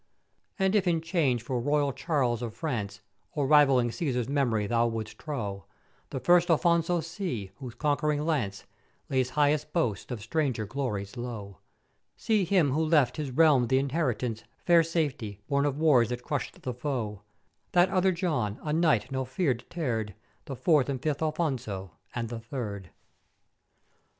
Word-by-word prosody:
And 190 -1 +2
if 200 -3 +2
in 170 -2 +3
change 160 -8 0
for 125 -1 -2
royal 145 +2 +1
Charles 135 -5 0
of 115 -2 -5
France, 105 -8 -3 0.3
or 145 -4 0
rivalling 135 -4 +5
Cæsar's 125 -5 -1
mem'ories 120 -7 0
thou 120 0 +3
wouldst 115 -2 -5
trow, 105 -10 -4 0.4
the 135 - -4
first 175 +6 +4
Afonso 170 0 +2
see, 150 - -4
whose 125 -5 -8
conquering 150 0 0
lance 120 -12 -1 0.5
lays 130 -2 +1
highest 150 +1 +1
boast 140 - -1
of 125 -4 -4
stranger 125 0 -1
glories 105 -3 -4
low: 105 -7 -6 0.6
See 215 -4 +1
him 175 -6 +3
who 155 +4 +1
left 155 -4 +3
his 150 -3 -3
realm 135 -3 +4
th' 130 - -2
inheritance 130 -5 0 0.2
fair 170 -1 +6
Safety, 145 - -2
born 140 0 +2
of 140 -1 -2
wars 145 -8 +4
that 125 0 -4
crusht 145 +1 -3
the 125 - -3
foe: 120 -6 -3 0.5
That 180 +1 +5
other 190 0 +3
John, 150 - -1
a 150 - -1
knight 160 -3 +2
no 130 0 -1
fear 130 +3 0
deter'd, 115 - -3 0.3
the 135 - -5
fourth 140 +2 +3
and 135 -2 -2
fifth 150 +2 -2
Afonso, 130 - -2 0.2
and 120 -1 -2
the 115 -1 -5
third. 110 -6 -6
135 Hz, 155 wpm, -28 LUFS, 120-160 Hz, 0.6 s, fair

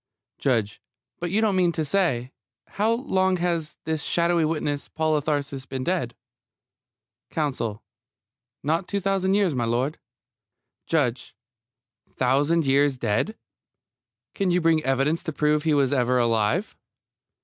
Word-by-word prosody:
JUDGE: 115 -7 0 0.4
But 175 - -2
you 205 +5 +1
don't 215 -3 +2
mean 180 -2 +3
to, 160 - -2
say 140 -8 0 0.4
how 215 +3 +1
long 190 -6 +1
has 170 -3 -2
this 160 -1 -2
shadowy 170 +1 +1
witness, 150 -2 -2
Paul 155 -1 0
of 150 -1 -1
Tarsus, 140 -3 -2
been 130 -1 -4
dead? 145 -8 -1 1.1
COUNSEL: 130 -9 -2 0.8
Not 165 +5 0
two 200 - -1
thousand 195 0 +1
years, 200 -6 +2
m'lud. 125 +4 0 0.9
JUDGE: 130 -6 0 0.8
Thousand 145 +6 +2
years 140 0 +3
dead? 120 - -1 1.0
Can 195 -3 0
you 180 0 +3
bring 160 -2 +2
evidence 135 +5 +1
to 160 - -4
prove 150 0 +1
that 160 - -1
he 150 - +4
was 140 -1 +2
ever 125 -1 +2
alive? 115 - +1
150 Hz, 135 wpm, -25 LUFS, 130-175 Hz, 1.1 s, he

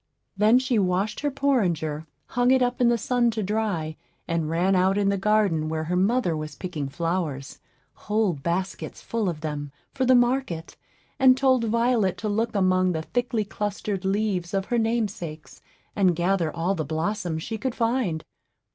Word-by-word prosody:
Then 215 +4 +5
she 255 -3 +1
washed 190 +3 0
her 290 - 0
porringer, 175 - 0 0.2
hung 245 0 +2
it 260 0 +5
up 245 0 -1
in 240 - +5
the 240 - +3
sun 240 +2 +1
to 215 - 0
dry, 195 -7 -2 0.3
and 165 -2 -1
ran 180 +4 +2
out 190 +2 +3
in 200 -1 +2
the 200 - +2
garden, 195 -7 +2
where 160 0 -2
her 175 +3 -2
mother 195 -1 +2
was 155 -1 -5
picking 155 -6 -4
flowers, 155 -3 -3 0.3
whole 210 -3 0
baskets 170 +6 -3
full 225 -4 -2
of 155 -3 -5
them, 145 -2 -4 0.2
for 275 - -1
the 255 0 +5
market, 245 -9 0 0.4
and 260 -1 +6
told 260 -3 +3
Violet 230 -3 +1
to 220 - -4
look 225 +2 -1
among 185 -1 +3
the 160 -1 -3
thickly 235 +1 -1
clustering 205 -1 -3
leaves 195 -2 -1
of 195 -1 0
her 240 +2 0
namesakes, 205 -9 -3 0.3
and 185 -4 +3
gather 175 -1 +1
all 170 +4 -1
the 165 -5 -2
blossoms 160 +1 -2
she 220 -1 -4
could 255 +1 -2
find. 230 -9 0
195 Hz, 175 wpm, -25 LUFS, 165-230 Hz, 0.4 s, and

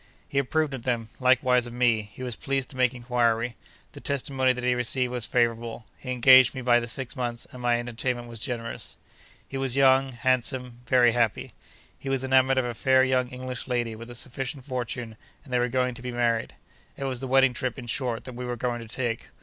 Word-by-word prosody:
He 140 - 0
approved 150 +2 0
of 130 - -5
them; 115 -2 -2
likewise 125 -1 +3
of 120 - -9
me. 120 -3 +3
He 130 - -9
was 125 -2 -3
pleased 135 +1 -2
to - - -10
make 125 0 +2
inquiry. 120 -1 0 0.4
The - - -11
testimony 135 -1 +1
that 125 -1 -4
he 125 0 +3
received 125 +1 0
was 125 -2 -2
favourable. 115 -1 0
He 130 - -8
engaged 130 +1 +7
me 130 - -4
by 120 -1 +5
the 120 - -5
six 125 +3 -6
months, 120 -2 -3
and 125 - -10
my 120 -1 +2
entertainment 120 +1 -3
was 115 -1 -9
generous. 115 -1 -5 0.5
He 135 - -5
was 135 -1 0
young, 135 -1 +4
handsome, 125 0 -1
very 125 -1 +5
happy. 115 -2 0 0.5
He 135 - -6
was 135 -1 0
enamoured 130 0 +4
of 130 - +2
a 120 - -3
fair 130 +3 +4
young 130 -1 +2
English 125 -1 -6
lady, 120 -3 -1
with 115 +2 -10
a 120 - -8
sufficient 130 +2 -5
fortune, 120 -3 -4 0.3
and 135 -4 -10
they 125 - +3
were 125 0 +1
going 125 0 0
to 120 - -10
be 125 0 -4
married. 120 -1 0 0.4
It - - -5
was 130 -2 -2
the 130 - -4
wedding 135 0 +4
trip, 130 +3 -3
in 125 - -7
short, 120 -1 -2
that 130 - -8
we 125 +1 -6
were 125 0 -3
going 120 0 -2
to 115 - -9
take. 115 -1 -3
125 Hz, 220 wpm, -26 LUFS, 120-130 Hz, 0.5 s, engaged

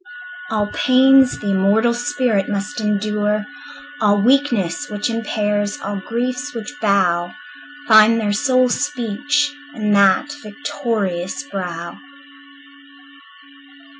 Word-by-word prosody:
All 210 -1 0
pains 265 0 +4
the 205 - -3
immortal 205 +5 +2
spirit 245 -6 -1
must 210 +6 -4
endure, 210 0 -1 0.6
All 205 -1 +3
weakness 250 - +1
which 210 +3 -2
impairs, 210 -2 -2
all 205 - -4
griefs 250 +7 -4
which 230 +5 -6
bow, 180 -4 +1 0.5
Find 220 +1 +6
their 205 -2 -1
sole 255 +2 +2
speech 290 +2 -1 0.2
in 210 -2 -1
that 200 +8 +3
victorious 210 -4 -3
brow. 180 -9 -6
215 Hz, 100 wpm, -19 LUFS, 205-255 Hz, 0.6 s, Find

